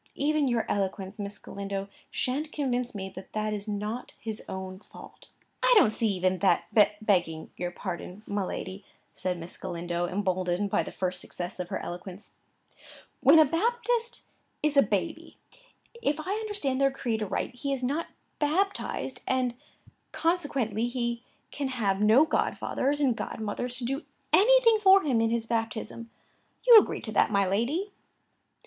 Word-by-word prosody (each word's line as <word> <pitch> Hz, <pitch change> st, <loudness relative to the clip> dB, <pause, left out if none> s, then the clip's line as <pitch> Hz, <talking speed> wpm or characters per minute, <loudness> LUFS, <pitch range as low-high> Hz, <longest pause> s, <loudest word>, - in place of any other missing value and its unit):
Even 300 Hz, 0 st, +1 dB
your 235 Hz, -3 st, +1 dB
eloquence, 195 Hz, +1 st, -2 dB
Miss 200 Hz, 0 st, -5 dB
Galindo, 195 Hz, 0 st, -5 dB, 0.2 s
shan't 290 Hz, +5 st, -2 dB
convince 250 Hz, -4 st, -1 dB
me 190 Hz, -1 st, -4 dB
that 190 Hz, 0 st, -10 dB
that 215 Hz, 0 st, -1 dB
is 205 Hz, 0 st, -5 dB
not 210 Hz, +3 st, -4 dB
his 220 Hz, -1 st, -5 dB
own 190 Hz, 0 st, -6 dB
fault." -, -, -14 dB, 0.3 s
"I -, -, +4 dB
don't 305 Hz, -, +5 dB
see 225 Hz, -, +1 dB
even 185 Hz, -2 st, +1 dB
that, 190 Hz, -4 st, +3 dB, 0.4 s
begging 175 Hz, -6 st, +1 dB
your 175 Hz, -, -3 dB
pardon, 180 Hz, +2 st, -6 dB
my 200 Hz, -1 st, -1 dB
lady," 190 Hz, +1 st, -5 dB, 0.3 s
said 180 Hz, -1 st, -2 dB
Miss 170 Hz, +1 st, -8 dB
Galindo, 175 Hz, 0 st, -3 dB
emboldened 185 Hz, 0 st, -1 dB
by -, -, +3 dB
the -, -, -6 dB
first 180 Hz, -1 st, -1 dB
success 180 Hz, +1 st, -6 dB
of 180 Hz, -1 st, -4 dB
her -, -, -2 dB
eloquence. 180 Hz, +3 st, -8 dB, 0.9 s
"When 275 Hz, +4 st, +7 dB
a 315 Hz, -, +8 dB
Baptist 470 Hz, -, 0 dB, 0.4 s
is 300 Hz, -1 st, +2 dB
a 280 Hz, -, +8 dB
baby, -, -, -2 dB, 0.6 s
if 295 Hz, -6 st, 0 dB
I 365 Hz, +6 st, -2 dB
understand 405 Hz, -12 st, -2 dB
their 275 Hz, -, +5 dB
creed 240 Hz, -5 st, -2 dB
aright, 210 Hz, +4 st, -2 dB
he 275 Hz, +3 st, -4 dB
is 265 Hz, -2 st, -2 dB
not 290 Hz, +6 st, -1 dB, 0.3 s
baptized; 330 Hz, -2 st, -1 dB
and, 255 Hz, -2 st, +1 dB, 0.6 s
consequently, 275 Hz, -, 0 dB
he 235 Hz, -1 st, -2 dB, 0.3 s
can 285 Hz, -2 st, -2 dB
have 210 Hz, -7 st, 0 dB
no 220 Hz, +8 st, +6 dB
godfathers 290 Hz, -2 st, 0 dB
and 260 Hz, -5 st, +3 dB
godmothers 240 Hz, +3 st, -3 dB
to 245 Hz, -, -3 dB
do 270 Hz, +5 st, -2 dB, 0.3 s
anything 460 Hz, +1 st, +6 dB
for 390 Hz, -1 st, +7 dB
him 250 Hz, -6 st, +2 dB
in 225 Hz, -, +2 dB
his 230 Hz, 0 st, 0 dB
baptism; 230 Hz, 0 st, -3 dB, 0.6 s
you 470 Hz, -3 st, +12 dB
agree -, -, -2 dB
to 220 Hz, -, -6 dB
that, 210 Hz, -, +3 dB
my 200 Hz, -2 st, +2 dB
lady?" 255 Hz, -, 0 dB
230 Hz, 155 wpm, -28 LUFS, 195-285 Hz, 0.9 s, you